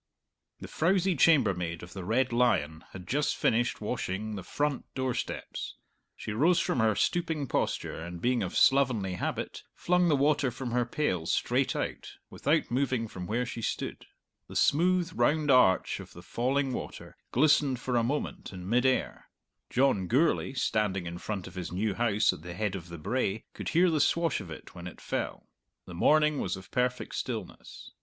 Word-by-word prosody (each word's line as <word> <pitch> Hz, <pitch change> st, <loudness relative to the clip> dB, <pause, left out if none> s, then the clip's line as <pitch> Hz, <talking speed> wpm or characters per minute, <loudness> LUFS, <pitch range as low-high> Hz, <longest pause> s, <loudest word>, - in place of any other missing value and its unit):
The -, -, -6 dB
frowsy 185 Hz, +2 st, +2 dB
chambermaid 95 Hz, -, +3 dB
of 85 Hz, 0 st, -10 dB
the 95 Hz, -, -6 dB
"Red 120 Hz, +5 st, +1 dB
Lion" 80 Hz, -10 st, +1 dB
had 90 Hz, -2 st, -10 dB
just 145 Hz, +6 st, 0 dB
finished 120 Hz, 0 st, +1 dB
washing 110 Hz, -2 st, -3 dB
the 95 Hz, -, -5 dB
front 145 Hz, -, -2 dB
door 130 Hz, -1 st, 0 dB
steps. -, -, -5 dB, 0.4 s
She -, -, -6 dB
rose 160 Hz, +11 st, +3 dB
from -, -, 0 dB
her 110 Hz, -2 st, +3 dB
stooping 160 Hz, -4 st, 0 dB
posture 115 Hz, -, -2 dB
and, 85 Hz, 0 st, -7 dB
being 125 Hz, +5 st, +1 dB
of -, -, -2 dB
slovenly 125 Hz, -9 st, +3 dB
habit, 90 Hz, -, -3 dB
flung 180 Hz, 0 st, +2 dB
the 155 Hz, -, +4 dB
water 145 Hz, -1 st, +2 dB
from 125 Hz, 0 st, -5 dB
her 120 Hz, 0 st, +1 dB
pail 95 Hz, -, -1 dB
straight -, -, +1 dB
out, -, -, -4 dB, 0.2 s
without -, -, 0 dB
moving 130 Hz, -2 st, 0 dB
from 90 Hz, -4 st, -7 dB
where 120 Hz, +4 st, 0 dB
she 115 Hz, -, -6 dB
stood. -, -, -4 dB, 0.4 s
The -, -, -11 dB
smooth 180 Hz, +3 st, +3 dB
round 150 Hz, -1 st, +2 dB
arch 110 Hz, -8 st, +4 dB
of -, -, -11 dB
the -, -, -12 dB
falling 135 Hz, +2 st, 0 dB
water -, -, -7 dB, 0.2 s
glistened 145 Hz, -1 st, +3 dB
for 125 Hz, 0 st, -2 dB
a 120 Hz, -, +4 dB
moment 135 Hz, +6 st, -3 dB
in 90 Hz, -1 st, -8 dB
mid 125 Hz, +5 st, +3 dB
air. 130 Hz, -, -1 dB, 0.4 s
John 125 Hz, -8 st, +2 dB
Gourlay, 135 Hz, -, +2 dB
standing 105 Hz, -7 st, 0 dB
in 85 Hz, 0 st, -6 dB
front 100 Hz, -3 st, -4 dB
of 95 Hz, -, -10 dB
his 90 Hz, -2 st, -5 dB
new 100 Hz, +3 st, 0 dB
house 110 Hz, -1 st, +2 dB
at -, -, -10 dB
the 85 Hz, +1 st, -8 dB
head 105 Hz, 0 st, -1 dB
of 90 Hz, -3 st, -7 dB
the 85 Hz, -, -7 dB
brae, 110 Hz, +4 st, -1 dB
could -, -, -5 dB
hear 175 Hz, +1 st, +4 dB
the 155 Hz, -2 st, +2 dB
swash 165 Hz, +2 st, +1 dB
of 85 Hz, -, -10 dB
it 80 Hz, -, -10 dB
when 85 Hz, 0 st, -8 dB
it 90 Hz, -, -10 dB
fell. -, -, -4 dB, 0.4 s
The 90 Hz, -, -10 dB
morning 150 Hz, -, +3 dB
was 90 Hz, 0 st, -2 dB
of 95 Hz, -, -13 dB
perfect 125 Hz, 0 st, -1 dB
stillness. -, -, -6 dB
120 Hz, 180 wpm, -29 LUFS, 95-140 Hz, 0.4 s, the